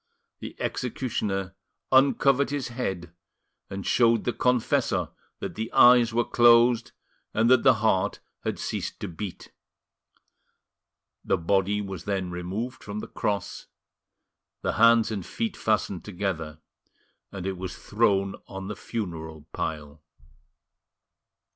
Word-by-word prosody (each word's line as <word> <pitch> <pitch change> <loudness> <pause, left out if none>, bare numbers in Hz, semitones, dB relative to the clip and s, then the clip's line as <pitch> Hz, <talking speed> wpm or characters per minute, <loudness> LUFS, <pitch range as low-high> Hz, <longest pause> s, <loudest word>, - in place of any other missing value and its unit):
The - - -9
executioner 105 -7 -2 0.4
uncovered 135 +1 +4
his 140 -4 -3
head 95 -9 -4 0.6
and 95 0 -6
showed 115 -2 +3
the 120 - -1
confessor 125 +1 +1 0.3
that - - -5
the 110 +1 -5
eyes 120 -2 +7
were 120 +1 +1
closed 120 0 +5 0.4
and 115 +3 +3
that 130 -2 +6
the 130 -2 +6
heart 95 -4 +1 0.2
had - - -2
ceased - - -4
to - - -3
beat. 90 +2 -7 1.7
The 95 - +1
body 95 +4 +1
was 95 -4 -7
then 95 -3 -2
removed 95 +9 -5
from 105 0 -6
the - - -5
cross, 100 -3 -3 1.0
the - - 0
hands 115 0 +5
and 100 -4 -3
feet 225 - -3
fastened 105 -4 -1
together, 85 -6 -4 0.7
and 95 -2 -6
it 95 0 -2
was 95 0 -6
thrown 100 -3 +1
on 95 0 -7
the 105 - -4
funeral 80 -9 -6
pile. 75 -1 -5
105 Hz, 120 wpm, -26 LUFS, 95-120 Hz, 1.7 s, eyes